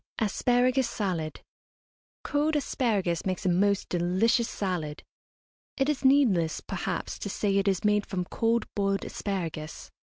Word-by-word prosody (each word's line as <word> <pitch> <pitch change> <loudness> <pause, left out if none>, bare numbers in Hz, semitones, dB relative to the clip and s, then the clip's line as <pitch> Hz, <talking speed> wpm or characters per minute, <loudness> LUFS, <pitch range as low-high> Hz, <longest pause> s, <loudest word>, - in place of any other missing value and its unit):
ASPARAGUS 245 +4 +2
SALAD. 175 -7 -3 0.8
Cold 300 +2 +1
asparagus 210 - 0
makes 185 -1 -3
a - - +3
most 200 +3 +2
delicious 185 +7 +2
salad. 175 -7 -3 0.7
It 270 +1 +1
is 295 -3 -1
needless, 225 - +4
perhaps, 185 -2 -4
to 200 - -4
say 200 0 0
it 195 0 +1
is 190 -3 +1
made 210 -1 +2
from 180 -2 -2
cold 230 +5 0
boiled 195 -1 0
asparagus. 165 -6 -5
200 Hz, 130 wpm, -28 LUFS, 180-235 Hz, 0.8 s, needless